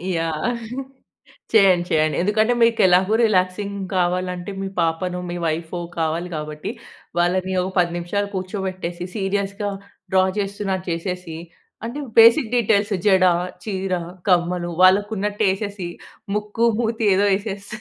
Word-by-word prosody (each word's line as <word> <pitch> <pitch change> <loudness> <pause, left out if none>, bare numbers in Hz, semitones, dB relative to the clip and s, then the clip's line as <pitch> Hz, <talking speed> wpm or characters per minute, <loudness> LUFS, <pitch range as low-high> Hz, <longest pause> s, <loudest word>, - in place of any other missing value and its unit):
Yeah! 165 +8 -1 1.0
చేయండి. 190 -5 +5
చేయండి. 155 -1 +2
ఎందుకంటే, 215 +4 +2
మీకెలాగో 190 -3 +4
రిలాక్సింగ్ 200 0 0 0.2
కావాలంటే, 180 +1 -1
మీ 195 - -3
పాపనో, 180 +2 -1
మీ 175 - -4
వైఫో 165 +2 -3 0.2
కావాలి 165 +2 -1
కాబట్టి, 150 +4 -5 0.5
వాళ్ళని 185 +2 +1
ఒక 185 - -3
10 175 -1 +2
నిమిషాలు 200 +4 -2
కూర్చోబెట్టేసి, 185 -2 -4
సీరియస్‌గా 200 0 -2 0.4
డ్రా 185 0 +5
చేస్తున్నట్టు 195 -2 -2
చేసేసి, 170 -1 -4 0.5
అంటే, 250 +5 -5 0.2
బేసిక్ 230 +1 +7
డీటేల్స్ 215 -3 +2
జడ, 190 -2 +5 0.4
చీర, 190 -3 -3 0.4
కమ్మలు 175 -1 +1
వాళ్ళకున్నట్టేసేసి, 205 0 +1 0.5
ముక్కు, 210 +2 -1 0.2
మూతి 225 -1 -1
ఏదో 200 +2 +3
ఎసేస్తే, 200 0 -6
190 Hz, 110 wpm, -21 LUFS, 175-205 Hz, 1.0 s, బేసిక్